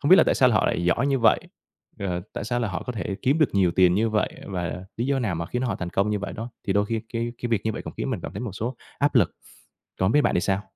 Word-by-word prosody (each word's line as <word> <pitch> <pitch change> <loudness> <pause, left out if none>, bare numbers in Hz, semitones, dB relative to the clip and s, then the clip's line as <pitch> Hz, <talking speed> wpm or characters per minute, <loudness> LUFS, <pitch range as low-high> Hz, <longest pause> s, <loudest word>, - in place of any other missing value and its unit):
Hông 145 - +1
biết 190 - +10
là - - +7
tại - - +2
sao 130 -1 +5
họ 105 - +3
lại 85 - 0
giỏi 115 +10 +2
như 135 -2 +2
vậy, 115 - +4 0.6
ờ, 90 -3 -2
tại - - -4
sao 120 +2 -1
là 115 - 0
họ 90 - -3
có 125 - -4
thể 100 -3 -3
kiếm 140 +5 +3
được 155 - +3
nhiều 95 -3 +4
tiền 90 0 +4
như 110 +4 +2
vậy, 110 -1 +1 0.2
và 90 -1 -4
lý 120 +3 -1
do 140 -1 +1
nào 110 -8 -1
mà 85 0 -3
khiến 125 +6 -2
họ 125 - -1
thành 90 -1 -4
công 100 +3 +1
như 105 - 0
vậy 100 - -5
đó, 115 +3 -6 0.2
thì 95 - +2
đôi 100 +1 +2
khi 115 0 -1
cái 115 +1 -2
cái 120 - -1
việc 115 -5 +1
như 110 - 0
vậy - - -5
cũng - - -7
khiến - - -2
mình - - -2
cảm - - -6
thấy - - -5
một 120 -5 -4
số 115 +6 -4 0.2
áp 145 +1 +2
lực. 105 -10 +4 0.7
Còn 95 - +2
hông 105 - +2
biết 150 - +5
bạn - - +2
thì 90 - +3
sao? 95 +1 +1
110 Hz, 325 wpm, -25 LUFS, 95-125 Hz, 0.7 s, biết